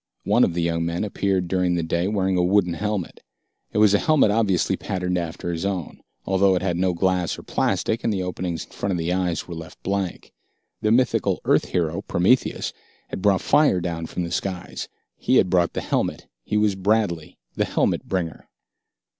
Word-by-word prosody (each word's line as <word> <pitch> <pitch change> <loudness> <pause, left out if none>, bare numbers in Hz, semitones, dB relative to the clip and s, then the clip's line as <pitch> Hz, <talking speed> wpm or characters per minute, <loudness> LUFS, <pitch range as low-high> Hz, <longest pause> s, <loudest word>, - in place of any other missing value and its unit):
One - - +3
of 85 - +1
the 85 - 0
young 85 0 0
men 85 +3 -2
appeared 95 -3 0
during 90 -1 +1
the 85 - -1
day 85 +2 0
wearing 95 -2 0
a 90 - +2
wooden 90 -1 +2
helmet. 105 -1 -3 0.5
It - - -3
was 105 -1 +5
a 100 - +4
helmet 155 -9 +4
obviously 105 -5 +2
patterned 90 -1 -2
after 85 0 -3
his 85 -1 -3
own, 95 -5 -3 0.2
although 95 0 +3
it 90 - -1
had 90 -3 0
no 90 0 +1
glass 90 -1 0
or - - -10
plastic, 110 - 0
and 115 - +1
the 95 -3 -1
openings 90 -2 -3
in - - -27
front 100 - -2
of - - -1
the 85 +1 -1
eyes 90 -2 -1
were 90 - -6
left 80 +1 -10
blank. 95 -2 -3 0.5
The 105 - +2
mythical 125 +1 +2
Earth - - +3
hero, 85 -2 -1
Prometheus, 95 +9 +1 0.4
had - - -5
brought 100 -2 +3
fire 150 -11 +4
down 85 -2 -3
from 90 - -3
the 85 - -5
skies. 90 0 -4 0.3
He - - +1
had 90 - +4
brought 90 -2 +2
the - - -2
Helmet. - - -1 0.2
He 105 - -1
was 105 -1 +3
Bradley, 95 -4 0 0.2
the - - +1
Helmet - - 0
Bringer. 85 -4 -3
90 Hz, 195 wpm, -23 LUFS, 85-100 Hz, 0.5 s, was